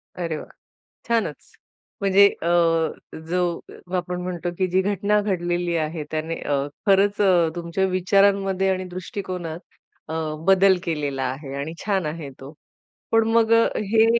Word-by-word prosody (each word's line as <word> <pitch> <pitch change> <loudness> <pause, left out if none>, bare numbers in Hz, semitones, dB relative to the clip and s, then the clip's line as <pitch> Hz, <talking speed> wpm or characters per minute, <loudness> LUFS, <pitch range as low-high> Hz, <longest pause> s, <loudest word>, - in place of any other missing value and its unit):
अरे 170 -3 -3
वाह! - - -9 0.6
छानच. 230 -1 -1 0.5
म्हणजे 200 0 +6
अ, 170 - -2 0.8
जो 180 +1 +1 0.5
अ, 185 - -2
आपण 180 0 -3
म्हणतो 180 -1 -3
की 185 -1 +1
जी 185 +1 +2
घटना 205 +2 +1
घडलेली 175 -3 -1
आहे 155 0 -2
त्याने 160 +1 -2
अ, 145 - 0 0.3
खरंच 200 +1 +4
अ, 175 -4 +4
तुमच्या 170 +2 -1
विचारांमध्ये 195 +1 +2
आणि 185 0 0
दृष्टिकोनात 180 -3 -5 0.5
अ, 160 - -5 0.3
बदल 195 -1 +5
केलेला 145 -5 -2
आहे 135 +1 -4
आणि 155 +3 -4
छान 195 -5 0
आहे 150 -1 -5
तो. 135 +3 -10 0.6
पण 225 0 +4
मग 230 -1 +3
अ, 230 0 +5 0.2
हे 225 0 +6
185 Hz, 145 wpm, -23 LUFS, 165-195 Hz, 0.8 s, म्हणजे